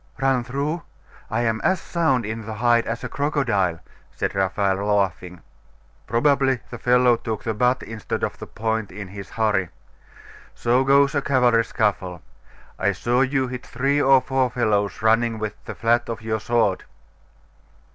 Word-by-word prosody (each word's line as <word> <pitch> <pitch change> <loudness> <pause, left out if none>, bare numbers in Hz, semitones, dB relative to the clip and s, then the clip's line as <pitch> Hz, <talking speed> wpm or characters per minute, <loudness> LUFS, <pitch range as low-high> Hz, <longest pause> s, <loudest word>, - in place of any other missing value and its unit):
'Run 135 -2 +2
through? 140 +7 -2 0.5
I - - 0
am 115 -1 0
as 185 -1 +2
sound 160 -11 0
in 110 0 -5
the 110 - -5
hide 120 +1 +2
as 115 +1 -4
a - - -2
crocodile, 120 - 0 0.3
said - - -3
Raphael, 95 0 +1
laughing. 95 -3 -1 0.7
'Probably 135 +2 +2
the 120 - -7
fellow 125 0 +4
took 110 -2 -5
the 110 - -1
butt 125 +4 +1
instead 110 -1 -5
of - - -2
the - - -8
point, 110 -1 -2
in 100 -1 -8
his 100 0 -9
hurry. 105 -5 0 0.9
So 125 +2 +2
goes 140 +1 +4
a 140 - +1
cavalry 125 -4 +3
scuffle. 95 -7 -1 0.6
I - - +2
saw 120 +2 +1
you 135 -1 +1
hit 125 0 -6
three 140 +4 0
or 135 -1 +5
four 130 -1 0
fellows 110 -4 0
running 115 +1 +3
with 110 -1 -3
the - - -6
flat 115 +1 +1
of 115 -1 -5
your 110 0 -1
sword. 110 -4 0
115 Hz, 160 wpm, -23 LUFS, 105-130 Hz, 0.9 s, or